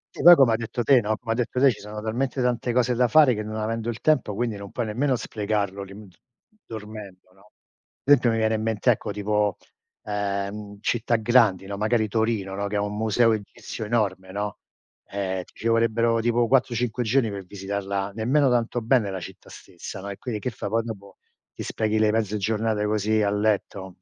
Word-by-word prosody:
Sì, - - -5
poi 175 +1 +10
come 135 -6 +5
hai 110 - +2
detto 120 +1 -3
te, 130 0 +5
no, 110 0 -1
come 115 - -5
hai 115 - 0
detto 125 +1 -1
te, 135 0 +6
ci 110 - -8
sono 105 +1 -7
talmente 120 +5 -2
tante 125 -1 0
cose 125 0 +2
da 125 +1 +3
fare 145 +1 +6
che 105 - -3
non 110 0 -6
avendo 110 +1 -2
il 120 0 -4
tempo 135 -9 +1
quindi 115 -1 -2
non 100 0 -9
puoi 120 - -2
nemmeno 130 +5 0
sprecarlo 100 -3 -2
lì 100 +2 -10
d 90 - -21 0.5
dormendo, 105 -4 -9
no. 100 +2 -23 0.5
Sempio 135 -3 +5
mi 115 - +1
viene 110 0 +1
in 110 - -1
mente, 110 +2 +2
ecco, 110 - -2
tipo, 105 0 0 0.5
ehm, 100 0 -3
città 120 0 0
grandi, 110 -4 +3
no, 100 0 -5
magari 110 +1 +1
Torino, 110 -3 -1
no, 100 +1 -2
che 105 - -4
ha 100 - +1
un 105 0 -4
museo 110 +2 +3
egizio 110 +1 -6
enorme, 100 -4 -1
no, 105 +1 -4 0.5
eh, 95 -2 -3
ti - - -22
ci 115 - -1
vorrebbero 115 0 +2
tipo 120 +1 +2
4-5 125 -2 +1
giorni 120 -1 +1
per 100 -1 -6
visitarla 100 0 -4
nemmeno 130 +6 +2
tanto 120 0 0
bene, 115 -2 +2
la 95 -1 -4
città - - -11
stessa, 90 +2 -9
no, 100 +1 -7
e 100 - -6
quindi 115 -4 -4
che 125 - -3
fai? 105 - -5
Poi 115 +2 +1
dopo 100 -4 -9 0.4
ti - - -6
sprechi 110 0 -1
le 110 -1 +3
mezze 105 -1 0
giornate 110 +1 0
così 110 +1 +1
a 100 - +1
letto? 100 -3 -1
110 Hz, 205 wpm, -24 LUFS, 100-120 Hz, 0.5 s, poi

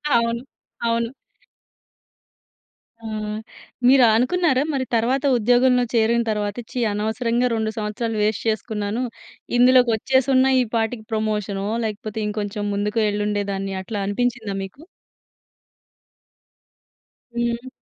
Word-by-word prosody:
అవును. 235 +1 +1 0.4
అవును. 230 0 +1 2.0
ఆ! - - -4 0.8
మీరు 260 -1 +7
అనుకున్నారా? 265 +4 +2
మరి 265 -1 -1
తర్వాత 255 +5 +1
ఉద్యోగంలో 245 +2 +4
చేరిన 235 +1 +3
తర్వాత 210 -1 -1 0.2
ఛీ! 250 - -3
అనవసరంగా 230 +4 0
2 220 0 -1
సంవత్సరాలు 215 +1 -2
వేస్ట్ 215 0 0
చేసుకున్నాను. 220 +1 -1 0.5
ఇందులోకి 250 0 +6
వచ్చేసి 260 +4 +1
ఉన్న 260 0 +4
ఈ - - +3
పాటికి 225 0 -1
ప్రమోషనో 210 -2 -1 0.2
లేకపోతే 215 0 -4
ఇంకొంచెం 205 0 -3
ముందుకు 210 +2 -1
వెళ్ళుండే 205 0 0
దాన్ని 195 0 -3
అట్లా 205 -1 -4
అనిపించిందా 220 -1 -1
మీకు? 230 +10 -14 2.5
హ్మ్. 235 +1 -1
225 Hz, 105 wpm, -22 LUFS, 210-245 Hz, 2.5 s, మీరు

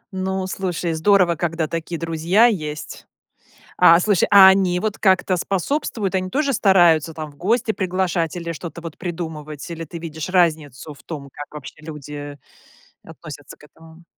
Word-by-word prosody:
Ну, 190 0 -2
слушай, 180 -3 -3
здорово, 175 +1 +3
когда 165 0 -2
такие 165 +1 -5
друзья 165 +7 +2
есть. 155 -9 -3 0.7
А, 170 +1 +7
слушай, 200 -1 +2
а 195 -2 +9
они 190 -2 +3
вот 210 +2 -3
как-то 185 -2 +2
способствуют? 200 - -2
Они 185 0 -1
тоже 280 +7 0
стараются 175 - +3
там 155 -1 -6
в 145 - -20
гости 220 +5 0
приглашать 180 -3 -1
или 170 -1 -4
что-то 170 +1 -8
вот 165 -2 -8
придумывать? 160 -4 -6
Или 165 0 -6
ты 170 +2 -9
видишь 160 -1 -6
разницу 155 -6 0
в 145 - -17
том, 140 -4 -8
как 145 - -8
вообще 150 -3 -9
люди 145 -2 -8 0.6
относятся 150 -3 -11
к - - -19
этому? 160 +2 -18
170 Hz, 155 wpm, -21 LUFS, 155-190 Hz, 0.7 s, а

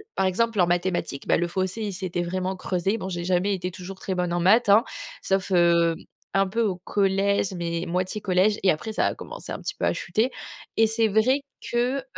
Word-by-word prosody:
par 190 - +1
exemple 215 +3 +1
en 180 - +6
mathématiques, 175 -5 -1
bah, - - +4
le 175 - 0
fossé 190 +4 -2
il 205 -2 -3
s'était 180 -2 -2
vraiment 185 +2 -2
creusé, 185 +3 -1
bon, 190 -3 -5
j'ai 175 -2 -4
jamais 185 +3 +1
été 185 -1 -3
toujours 185 +2 -9
très 190 - -3
bonne 180 -1 -1
en 175 - 0
maths, 210 +7 +4
hein, 210 +3 +7 0.4
sauf, 195 0 -1
heu, 170 -2 +4 0.4
un 195 0 +3
peu 225 +5 -1
au 200 -4 0
collège, 195 +1 +1
mais 170 0 -2
moitié 185 +4 -1
collège 195 +1 +2
et 190 - +5
après 155 +8 -3
ça - - +1
a - - -2
commencé - - -9
un - - -5
petit - - -5
peu - - -2
à - - +2
chuter. 235 +5 0 0.4
Et 225 - +5
c'est 225 0 +2
vrai 220 +7 +2 0.3
que, 245 +3 +1
heu, - - -8
190 Hz, 220 wpm, -25 LUFS, 180-210 Hz, 0.4 s, hein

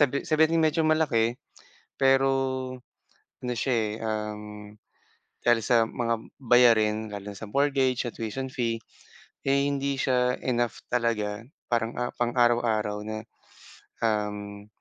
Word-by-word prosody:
sabi 140 -1 +2
sabi 155 0 +1
nating 165 0 +2
medyo 155 +1 +2
malaki 125 -8 +2 0.6
pero 135 0 +4 1.1
ano 125 0 -2
siya 130 0 0
eh, 110 -2 0
um, 105 -1 -3 1.0
dahil 120 -1 +5
sa 120 -2 +4
mga 115 -2 -1 0.3
bayarin 110 -3 +4
lalo 100 0 -6
na - - -12
sa 105 0 -8
mortgage, 135 -2 +2
sa 120 - -5
tuition 115 +4 -4
fee, 115 -3 -2 0.7
eh 140 0 +3
hindi 140 -1 -1
siya 125 -1 +2
enough 120 -2 -1
talaga 115 -3 0 0.3
parang 115 -1 +1
ah, 120 - -2
pang-araw-araw 120 -3 +1
na, 110 0 -5 0.8
um, 105 -1 -2
120 Hz, 125 wpm, -27 LUFS, 110-130 Hz, 1.1 s, dahil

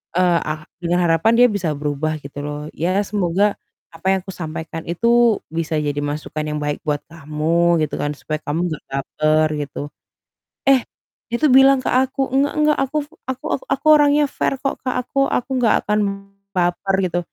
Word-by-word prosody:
eee, 180 -1 +3
ah 155 0 -3 0.2
dengan 175 +1 +1
harapan 165 +6 +3
dia 245 - +8
bisa 180 -5 -1
berubah 150 +1 -1
gitu 140 0 -10
loh. 145 0 -4 0.3
"Ya 175 - +2 0.2
semoga, 195 -2 +1 0.5
apa 165 - -17
yang 190 - +2
aku 190 - -7
sampaikan 160 0 -5
itu 175 +7 -1 0.5
bisa 165 -1 -2
jadi 145 -1 -2
masukan 150 +1 -4
yang 150 0 -2
baik 145 0 -1
buat 145 -1 +1
kamu, 155 -1 -6 0.4
gitu 150 - -1
kan, 145 - -1
supaya 155 -1 -3
kamu 150 +2 -1
nggak 155 - -6
baper," 155 +3 +1
gitu. 145 -1 -6 0.9
Eh, 265 -2 +6 0.5
dia 235 - -1
tuh 300 - +6
bilang 270 0 +6
ke - - -2
aku, 265 +1 +1
"Enggak 275 +2 +2
enggak, 300 0 +3
aku 270 +3 -3 0.3
aku 260 +4 -8 0.3
aku 275 - -6
orangnya 295 0 +4
fair - - +1
kok 275 - -1
Kak. 255 - -1
Aku 265 - -11 0.2
aku 250 - -5
nggak 240 -3 +3
akan 210 +1 +1 0.6
baper," 180 +2 +1
gitu. 175 -1 -1
175 Hz, 175 wpm, -20 LUFS, 155-250 Hz, 0.9 s, dia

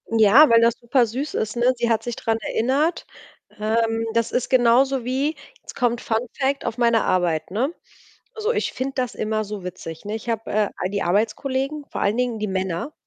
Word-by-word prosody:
Ja, 225 +8 +7
weil 230 0 +6
das 230 0 +4
supersüß 245 +3 0
ist, 220 +2 -2
ne? 245 +2 +3
Sie 235 -1 -1
hat 225 -1 +1
sich 240 -1 -4
dran 225 -1 -1
erinnert, 275 +11 0 0.5
ähm, 225 +1 0
das 230 -1 0
ist 250 - -1
genauso 255 +1 +3
wie 270 +5 -1 0.3
jetzt - - -11
kommt 240 -1 0
Fun-Fact 250 +5 -2
auf 230 0 -3
meine 235 -2 +3
Arbeit, 175 -3 0
ne? 255 - -1 0.6
So, 440 +1 -1
ich - - -1
finde 265 +2 -3
das 250 -2 -2
immer 215 0 -1
so 205 -2 -7
witzig. 180 -1 -8
Ne, 210 +1 -3
ich 225 +2 -6
habe, 225 -1 -3
äh, 210 -1 +1
all 185 - -2
die 200 -1 -1
Arbeitskollegen, 260 - -1
vor - - -4
allen 205 +3 +1
Dingen 245 -3 -1
die 215 - -2
Männer, 190 - -3
230 Hz, 195 wpm, -22 LUFS, 215-260 Hz, 0.6 s, Ja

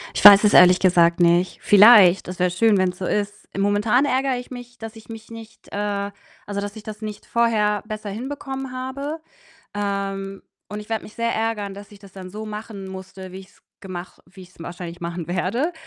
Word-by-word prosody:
Ich - - -2
weiß 200 +1 +10
es 210 - +3
ehrlich 180 0 +7
gesagt 170 -2 +3
nicht. 175 +1 +2
Vielleicht, 205 -4 +7
das 180 - -7
wär 180 -1 +1
schön, 215 +2 +3
wenn's 180 -1 -1
so 185 - -3
ist. 205 +1 -3
I - - -3
momentan 210 +7 +2
ärgere 265 -1 0
ich 250 +1 -9
mich, 245 0 -10
dass 225 0 -9
ich 225 +1 -15
mich 225 0 -10
nicht, 225 -1 -13
äh 200 0 -2 0.3
also, 200 0 -4
dass 205 +1 -6
ich 215 - -10
das 215 0 -9
nicht 215 -1 -7
vorher 215 -3 +1
besser 215 -1 -6
hinbekommen 270 +3 -6
habe. 275 +5 -5 0.5
Ähm, 195 -1 -4 0.3
und 210 +1 -6
ich 210 - -12
werde 225 -1 -3
mich 210 - -13
sehr 230 0 -1
ärgern, 215 -3 -2
dass 205 +1 -12
ich 200 - -14
das 200 -2 -16
dann 185 -1 -10
so 215 +2 -7
machen 210 -2 -8
musste, 190 0 -10
wie 190 - -8
ich's 190 +1 -19 0.2
gemach 185 -2 -8
wie 185 +1 -15
ich's 180 0 -17
wahrscheinlich 175 +1 -8
machen 170 0 -5
werde. 225 - -1
205 Hz, 205 wpm, -22 LUFS, 190-225 Hz, 0.5 s, weiß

